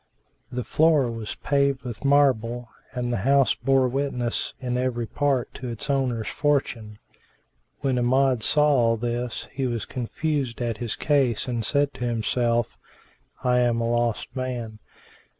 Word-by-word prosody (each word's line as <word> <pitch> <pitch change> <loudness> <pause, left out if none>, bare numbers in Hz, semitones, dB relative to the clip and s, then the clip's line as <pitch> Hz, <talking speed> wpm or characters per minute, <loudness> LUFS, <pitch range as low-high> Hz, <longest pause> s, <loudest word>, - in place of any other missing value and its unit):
The 125 0 -3
floor 150 -5 +3
was 115 -2 -5
paved 140 -2 +1
with 120 -2 -7
marble 125 -4 +2 0.2
and 120 -1 -2
the - - 0
house 135 +5 +3
bore 135 0 +2
witness 125 -2 -2
in 125 -2 -2
every 125 -2 -1
part 135 0 0
to 125 - -7
its 115 +3 -3
owner's 125 -5 0
fortune. 125 -7 -1 0.8
When 135 -3 +1
Amjad 130 0 +2
saw 150 +7 +4
all 120 -5 +3
this, 120 +1 -3
he 135 -1 -2
was 120 -3 -2
confounded 130 0 -2
at 120 -3 -2
his 120 -3 -3
case 135 -5 +1
and 120 -2 -2
said 145 +4 +1
to - - -6
himself, 120 0 0 0.6
"I 125 0 +3
am 120 -1 +2
a 115 - 0
lost 120 -2 -1
man! 120 -4 -4
125 Hz, 150 wpm, -25 LUFS, 115-135 Hz, 0.8 s, saw